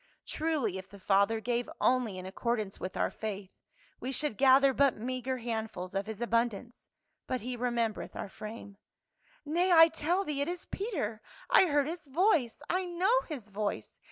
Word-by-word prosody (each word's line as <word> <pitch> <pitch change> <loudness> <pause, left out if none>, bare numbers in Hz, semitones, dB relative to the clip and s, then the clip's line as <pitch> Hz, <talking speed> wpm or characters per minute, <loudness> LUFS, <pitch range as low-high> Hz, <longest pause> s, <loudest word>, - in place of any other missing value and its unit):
Truly 290 - -1
if 190 - -11
the 200 - -12
Father 200 +3 +3
gave 240 +1 -1
only 245 -6 +2
in 185 - -7
accord 235 +5 -1
ance 200 -2 -5
with 185 - -5
our - - +1
faith, 205 -3 -5 0.5
we 260 - -4
should 290 -2 -1
gather 270 +2 +6
but 275 -1 +3
meagre 255 +3 -3
handfuls 220 -6 -4
of 195 +1 -2
his 220 0 -6
abundance; 235 0 -1 0.4
but 255 -1 -2
he 250 +3 -4
remembereth 235 -3 -2
our - - -4
frame. 210 0 -9 0.4
" - - -52 0.3
Nay, 345 +5 +1
I 325 -1 +9
tell 335 +4 0
thee 295 -6 -2
it 285 - 0
is 350 0 -4
Peter; 280 - -3 0.3
I 380 - +7
heard 290 -3 +2
his 330 -1 -6
voice, 295 - +2
I 370 +1 0
know 360 +6 +2
his 250 -9 -6
voice 200 - -4
245 Hz, 180 wpm, -31 LUFS, 215-300 Hz, 0.5 s, I